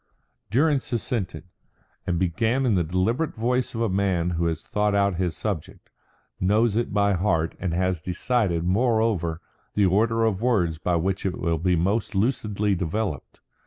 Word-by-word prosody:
Durrance 140 +4 +1
assented, 100 - -2 0.6
and 85 - 0
began 110 +9 +1
in 120 - +3
the 90 -3 +2
deliberate 95 - 0
voice 125 +2 -1
of 115 - -2
a 115 - +2
man 95 -3 0
who 85 0 0
has 80 -1 -3
thought 105 -1 0
out 100 -3 +2
his 90 -2 -1
subject, 100 -8 -5 0.5
knows 105 +3 +2
it 120 +1 0
by 100 -1 +2
heart, 85 -3 0
and 90 - -2
has 90 -2 0
decided, 90 -1 0
moreover, 100 -4 +1 0.3
the 105 - +4
order 115 +4 +2
of 105 -3 0
words 90 -10 +1
by 90 +2 0
which 95 +3 -1
it 95 -2 -2
will 85 -2 -1
be 90 +2 +2
most 100 +6 0
lucidly 105 -2 0
developed. 90 -3 -3
100 Hz, 160 wpm, -25 LUFS, 90-115 Hz, 0.6 s, the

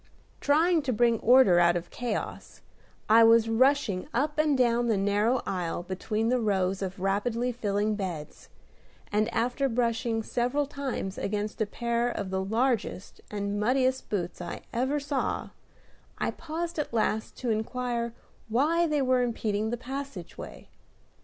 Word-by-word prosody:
Trying 320 +3 +3
to 275 -3 -1
bring 235 0 +3
order 240 -8 +6
out 175 0 +4
of 175 0 -4
chaos, 240 -3 -5 0.5
I 225 +2 +7
was 225 0 +6
rushing 230 -4 +2
up 295 +4 0
and 300 -3 +3
down 240 -1 +2
the 220 -3 +2
narrow 205 +5 +1
aisle 175 -2 -2
between 210 +5 -2
the 250 0 +2
rows 195 -3 0
of 190 0 -4
rapidly 225 +6 0
filling 210 -2 0
beds, 180 -7 -6 0.6
and, 215 +2 +1
after 245 +4 0
brushing 230 -1 0
several 250 +6 0
times 270 -9 -4
against 210 +2 -3
a 215 - +1
pair 235 +2 -1
of 200 -5 -4
the 190 0 -1
largest 225 -1 -1
and 205 0 -2
muddiest 255 +4 +1
boots 180 -3 -3
I 175 0 -6
ever 260 +5 0
saw, 285 -1 -2 0.7
I - - -1
paused 330 +1 -5
at 300 - -2
last 220 0 0
to 245 -3 -1
inquire 235 +1 -2 0.4
why 315 +9 +2
they 300 -3 +1
were 255 -1 +3
impeding 220 -3 -1
the 240 - -2
passageway. 260 -6 -7
230 Hz, 145 wpm, -28 LUFS, 205-255 Hz, 0.7 s, I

